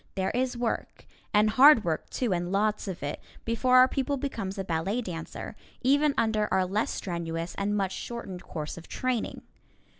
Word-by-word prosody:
There 190 -1 0
is 250 0 -1
work, 235 -1 -3 0.3
and 210 +1 +4
hard 260 0 +8
work, 160 -4 -2
too, 240 -7 0
and 175 0 -2
lots 210 +1 +1
of 185 -6 -5
it, 145 +1 -3 0.3
before 250 +3 +3
our 255 0 +8
pupil 275 +1 -1
becomes 225 -8 -4
a 195 - -2
ballet 185 +6 -1
dancer, 170 -7 -6 0.3
even 285 +2 +3
under 215 -2 +1
our 190 0 +3
less 205 +4 0
strenuous 170 -2 -3
and 205 +1 -1
much 195 -2 0
shortened 195 -7 -6
course 155 +1 -6
of 165 - -14
training. 255 -3 -2
210 Hz, 175 wpm, -28 LUFS, 180-245 Hz, 0.3 s, hard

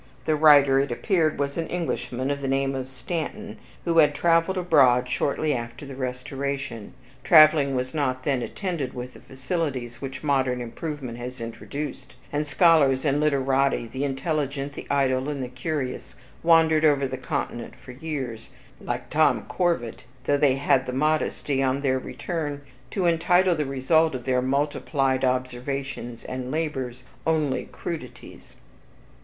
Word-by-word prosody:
The 155 - +2
writer, 145 -3 +6
it 140 -1 0
appeared, 160 - +1
was 140 +3 -2
an 165 - -2
Englishman 135 -6 -2
of 140 0 -3
the 135 - -2
name 135 0 +1
of 130 -1 -4
Stanton, 170 - -5 0.3
who 165 -1 +3
had 150 -2 +5
traveled 165 +4 +2
abroad 135 -8 +4
shortly 145 +4 0
after 120 +2 -5
the 140 - -8
Restoration. 135 -2 -4 0.3
Traveling 155 -4 +6
was 130 0 -2
not 130 -4 -1
then 135 -3 0
attended 170 - -4
with 125 0 -6
the - - -13
facilities 130 -3 -4
which 135 +1 -6
modern 130 -4 +1
improvement 125 0 -6
has 125 +1 -7
introduced, 130 +3 -6 0.2
and 150 +1 -1
scholars 145 -5 +4
and 145 0 +2
literati, 135 -3 +2
the 130 +1 -2
intelligent, 140 0 -2
the - - -8
idle, 135 -1 +1
and 140 -3 -3
the - - -3
curious, 130 +1 -4 0.3
wandered 160 -2 +4
over 145 -3 +4
the - - -4
Continent - - -4
for - - -12
years, 130 -5 -5 0.3
like - - -4
Tom - - +3
Corvat, 170 -11 -1 0.2
though 145 - +3
they 140 -2 +3
had 135 -1 +2
the 125 - -3
modesty, 145 -1 0
on 135 +1 +1
their 130 -2 +1
return, 145 0 -4 0.3
to 190 - -1
entitle 175 +2 +3
the 155 -3 -1
result 140 +3 +2
of 125 - -6
their 130 -1 +2
multiplied 135 0 0
observations 130 -1 -3
and 130 0 -5
labors 130 -5 -3 0.2
only 155 -4 +1
"crudities." 125 -8 -8
140 Hz, 150 wpm, -25 LUFS, 130-155 Hz, 0.3 s, writer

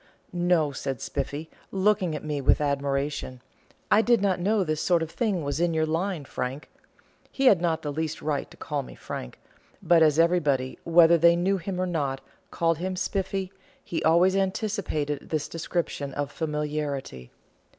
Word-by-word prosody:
"No," 175 -4 +2
said 135 -1 -4
Spiffy, 150 +7 -4 0.2
looking 190 -4 +1
at - - -6
me 150 -2 -2
with 135 - +4
admiration; 140 -2 -2 0.5
"I 215 - +6
did 235 0 +3
not 195 -2 +1
know 200 +3 +2
this 155 -3 -2
sort 175 -2 +2
of 165 - -6
thing 200 -7 -1
was 145 +2 -2
in 170 -1 +1
your 160 0 +2
line, 165 0 -2
Frank." 130 +3 -5 0.6
He 270 - -1
had 200 -9 +6
not 165 -2 0
the 145 -1 -3
least 160 +1 -3
right 150 -2 -2
to - - -16
call 145 -1 -3
me 130 - -11
Frank; - - -7 0.4
but 170 -2 +4
as 155 -2 +5
everybody, 150 -7 +2
whether 170 0 +6
they 170 +1 +6
knew 190 +3 +1
him 180 +1 -4
or 185 - +1
not, 145 -7 -1 0.3
called 165 -2 0
him 185 +1 -2
Spiffy, 190 0 -2 0.3
he 170 - -3
always 175 +4 +4
anticipated 190 -7 -2
this 155 -2 -1
description 160 -4 -3
of 145 0 -2
familiarity. 150 - -3
160 Hz, 170 wpm, -26 LUFS, 145-180 Hz, 0.6 s, I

